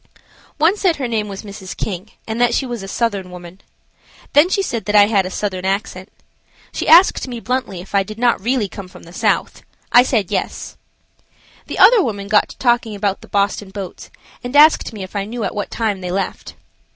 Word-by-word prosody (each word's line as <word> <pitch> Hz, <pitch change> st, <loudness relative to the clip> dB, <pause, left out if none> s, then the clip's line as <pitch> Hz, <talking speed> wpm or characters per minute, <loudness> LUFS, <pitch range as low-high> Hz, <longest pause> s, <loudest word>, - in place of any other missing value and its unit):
One 325 Hz, +7 st, +3 dB
said 370 Hz, -5 st, +2 dB
her 270 Hz, -4 st, -3 dB
name 220 Hz, -3 st, -1 dB
was 195 Hz, 0 st, -7 dB
Mrs. 200 Hz, -2 st, -9 dB
King 195 Hz, +1 st, -4 dB, 0.2 s
and 225 Hz, +2 st, -3 dB
that 240 Hz, -1 st, +3 dB
she 270 Hz, -, 0 dB
was 240 Hz, -4 st, -5 dB
a 195 Hz, -, -7 dB
Southern 200 Hz, -3 st, -2 dB
woman. 180 Hz, +1 st, -11 dB, 0.7 s
Then 300 Hz, +5 st, +5 dB
she 395 Hz, +1 st, +1 dB
said 235 Hz, -10 st, -3 dB
that 210 Hz, -, -1 dB
I 205 Hz, -1 st, +8 dB
had 200 Hz, -3 st, +1 dB
a -, -, -5 dB
Southern 185 Hz, -2 st, -3 dB
accent. 190 Hz, -1 st, -3 dB, 0.6 s
She -, -, -4 dB
asked 340 Hz, -3 st, +6 dB
me 240 Hz, -2 st, -6 dB
bluntly 235 Hz, -7 st, -3 dB
if 190 Hz, -, -14 dB
I 200 Hz, -, +4 dB
did 215 Hz, +3 st, -7 dB
not 240 Hz, -3 st, +2 dB
really 240 Hz, 0 st, 0 dB
come 195 Hz, 0 st, -9 dB
from 180 Hz, -, -15 dB
the 170 Hz, -, -14 dB
South. -, -, -1 dB, 0.3 s
I 245 Hz, -, +8 dB
said 225 Hz, -7 st, 0 dB
"Yes." -, -, -3 dB, 0.9 s
The -, -, -5 dB
other 415 Hz, +3 st, +7 dB
woman 205 Hz, -5 st, -4 dB
got 210 Hz, 0 st, +3 dB
to -, -, -12 dB
talking 240 Hz, -3 st, +1 dB
about 200 Hz, -1 st, -2 dB
the -, -, -13 dB
Boston 200 Hz, 0 st, -1 dB
boats 190 Hz, -2 st, -8 dB, 0.3 s
and 245 Hz, +3 st, -5 dB
asked 305 Hz, -1 st, +5 dB
me 210 Hz, -4 st, -7 dB
if 185 Hz, -, -11 dB
I 200 Hz, -1 st, -1 dB
knew 230 Hz, +2 st, -5 dB
at -, -, -2 dB
what 205 Hz, -1 st, -4 dB
time 215 Hz, -4 st, -2 dB
they 180 Hz, -, -5 dB
left. 195 Hz, +2 st, -4 dB
210 Hz, 210 wpm, -18 LUFS, 195-245 Hz, 0.9 s, I